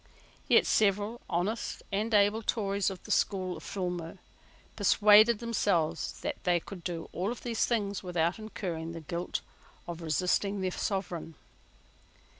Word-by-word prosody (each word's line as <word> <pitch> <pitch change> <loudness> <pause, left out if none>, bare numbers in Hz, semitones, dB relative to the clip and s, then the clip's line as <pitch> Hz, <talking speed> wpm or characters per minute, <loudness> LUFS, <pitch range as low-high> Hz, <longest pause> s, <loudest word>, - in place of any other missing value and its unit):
Yet - - +6
several 210 +2 +2
honest 190 +6 -2
and 210 +3 -1
able 205 +1 +4
Tories 200 -3 0
of 190 -2 -8
the - - -7
school 185 -3 +1
of - - -11
Filmer 180 -4 -4 0.6
persuaded 210 +2 +6
themselves 205 -8 0
that - - -4
they 175 -1 +3
could 180 +1 -10
do 170 -2 -4
all 190 +5 -2
these 235 -2 -1
things 205 -4 -1
without 175 +1 0
incurring 175 -7 -5
the 165 - -7
guilt 170 +3 -3 0.5
of 170 -1 -6
resisting 185 +5 0
their 185 -1 0
Sovereign. 180 -5 -3
195 Hz, 135 wpm, -30 LUFS, 175-210 Hz, 0.6 s, Yet